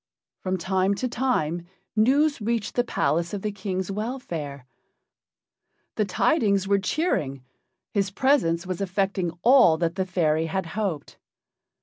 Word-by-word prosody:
From 185 0 -1
time 190 +2 +1
to 255 - -2
time 175 -10 -1 0.3
news 275 +5 +3
reached 225 -1 -1
the 245 - +2
palace 170 - 0
of 195 - -6
the 210 - -1
King's 190 -2 -3
welfare. 175 - -5 1.3
The 215 - 0
tidings 200 - +2
were 200 0 +3
cheering. 155 - -1 0.5
His 200 -2 +1
presence 195 -8 +2
was 185 0 -4
effecting 195 -1 0
all 240 -10 +6
that 165 0 0
the 190 +1 -1
fairy 160 -3 +1
had 190 +3 -2
hoped. 195 -9 -3
195 Hz, 130 wpm, -25 LUFS, 170-220 Hz, 1.3 s, all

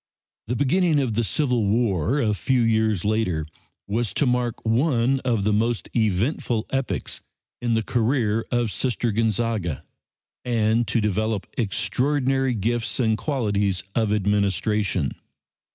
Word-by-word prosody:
The 125 - -1
beginning 155 +5 +2
of 130 -5 0
the 115 +2 +1
Civil 125 -1 +1
War 105 - +1
a 110 -5 +1
few 125 +6 +1
years 110 -4 +1
later 100 -8 0 0.4
was 110 +2 -2
to 145 - +2
mark 125 -2 -1
one 125 +2 +2
of 120 -6 0
the 105 +1 +2
most 115 +2 0
eventful 110 - 0
epochs 135 -1 -2 0.4
in 120 -2 +1
the 110 - +1
career 115 -1 +1
of 120 -3 0
Sister 120 -1 0
Gonzaga, 110 - -1 0.6
and 115 -1 +1
to 110 +2 +1
develop 105 0 -1
extraordinary 130 +5 0
gifts 115 +4 -1
and 110 -3 +2
qualities 105 -6 -1
of 110 -3 +1
administration. 100 - +1
115 Hz, 130 wpm, -24 LUFS, 105-125 Hz, 0.6 s, beginning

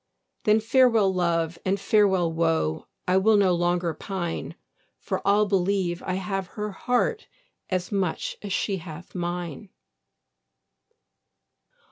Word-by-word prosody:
Then 215 0 +5
farewell 225 -3 +4
love, 170 -2 0
and 195 +1 0
farewell 190 -4 +3
woe, 160 - 0 0.2
I 180 +1 +4
will 210 +3 +4
no 190 -3 +4
longer 175 -1 +1
pine; 180 -3 -4 0.4
For - - -3
I'll 205 +1 +4
believe 190 -2 0
I 185 - -2
have 190 0 -3
her 210 0 -2
heart 250 - 0 0.4
As 185 0 -2
much 190 -5 -1
as 205 - -6
she 195 +1 0
hath 165 0 -10
mine. 175 0 -4
185 Hz, 120 wpm, -25 LUFS, 175-205 Hz, 0.4 s, Then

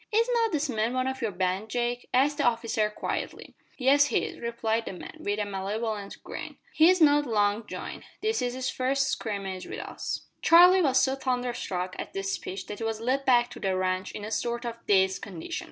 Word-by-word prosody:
"Is 455 +2 +3
not 460 -2 +2
this 305 -2 0
man 230 -1 -1
one 255 0 +1
of 265 0 -3
your 225 - 0
band, 190 +2 -1
Jake?" 245 +1 -2
asked 285 +4 +2
the - - +2
officer 230 -3 +1
quietly. 210 - -5 0.2
"Yes, 280 +2 +5
he - - +1
is," - - -8
replied 230 -1 -1
the - - -5
man 180 - -9
with 205 0 -2
a 210 - -1
malevolent 205 +1 -4
grin. - - -7 0.2
"He's 360 +4 +5
not 295 -2 +5
long 210 -1 +1
joined. - - -7
This 435 -7 0
is 245 0 -1
his 260 0 -2
first 270 +1 +1
scrimmage 195 -4 -4
with - - -6
us." - - -5 0.2
Charlie 360 +3 +7
was 265 -5 +4
so 265 0 +2
thunderstruck 245 -9 -2
at - - -6
this 195 0 -2
speech 190 +1 -5
that 205 - -7
he - - -4
was 225 -1 -2
led 260 +4 0
back 245 -1 +4
to - - -9
the 190 -1 0
ranch 185 0 -1
in 205 - -6
a 215 - -6
sort 235 +1 -2
of 230 0 -6
dazed 190 -1 +3
condition. 175 -5 -5
235 Hz, 210 wpm, -27 LUFS, 205-265 Hz, 0.2 s, Charlie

